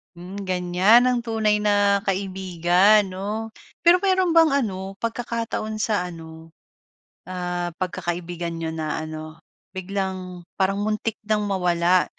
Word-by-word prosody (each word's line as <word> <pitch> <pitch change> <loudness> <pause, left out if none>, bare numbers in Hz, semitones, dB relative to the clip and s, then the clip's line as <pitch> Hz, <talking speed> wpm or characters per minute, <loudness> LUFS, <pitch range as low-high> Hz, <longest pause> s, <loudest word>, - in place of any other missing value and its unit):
Hmm, 180 +3 -8
ganyan 185 +6 +4
ang 250 -1 +2
tunay 220 -3 +1
na 205 -1 +3
kaibigan, 190 +1 +3
'no. 205 +4 -5 0.3
Pero, 345 +1 +6
meron 375 -2 +2
bang 330 0 +6 0.2
ano 190 -2 -5
pagkakataon 230 -2 -3
sa 215 -4 0
ano, 160 -1 -11 0.7
ah, 180 -1 -3
pagkakaibigan 175 -1 -3
niyo 165 - -2
na 160 -1 -3
ano, 155 0 -8 0.3
biglang 185 -2 -4 0.2
parang 190 +1 +2
muntik 215 +1 -2
nang 210 -1 0
mawala, 180 -1 +2
190 Hz, 120 wpm, -23 LUFS, 175-215 Hz, 0.7 s, Pero